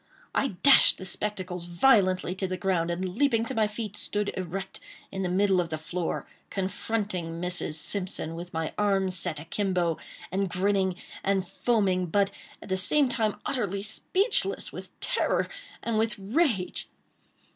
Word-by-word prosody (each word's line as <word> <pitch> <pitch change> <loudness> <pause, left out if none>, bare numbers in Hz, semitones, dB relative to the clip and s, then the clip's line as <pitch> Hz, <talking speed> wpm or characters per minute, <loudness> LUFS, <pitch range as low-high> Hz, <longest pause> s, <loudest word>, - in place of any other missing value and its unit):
I 270 -9 0
dashed 280 -1 +8
the 185 - -7
spectacles 185 -2 -3
violently 185 -1 +3
to 190 0 -2
the 185 0 -3
ground, 175 -2 +1
and, 175 +2 -1
leaping 235 -3 +2
to - - -4
my 220 -1 +2
feet, 210 -1 -5
stood 210 0 -2
erect 190 +1 -5 0.3
in 190 - -3
the 185 - 0
middle 190 0 +3
of 170 - -4
the 155 - -2
floor, 170 +2 -3 0.2
confronting 190 -3 -2
Mrs. 180 -3 -1
Simpson, 180 -1 0
with 175 +2 -7
my 160 -1 -2
arms 195 -3 +2
set 170 -3 -2
a 150 - -9
kimbo, 180 -2 0 0.3
and 195 +1 0
grinning 190 0 +1 0.3
and 195 -2 +1
foaming, 190 -5 +1
but, 200 +4 +2 0.3
at - - -11
the 190 - +1
same 270 +9 +4
time, 220 -4 0
utterly 200 -7 -1
speechless 390 - +1
with - - -8
terror - - +1 0.4
and 230 -2 0
with 225 -1 0
rage. 210 - 0
190 Hz, 155 wpm, -28 LUFS, 180-210 Hz, 0.4 s, dashed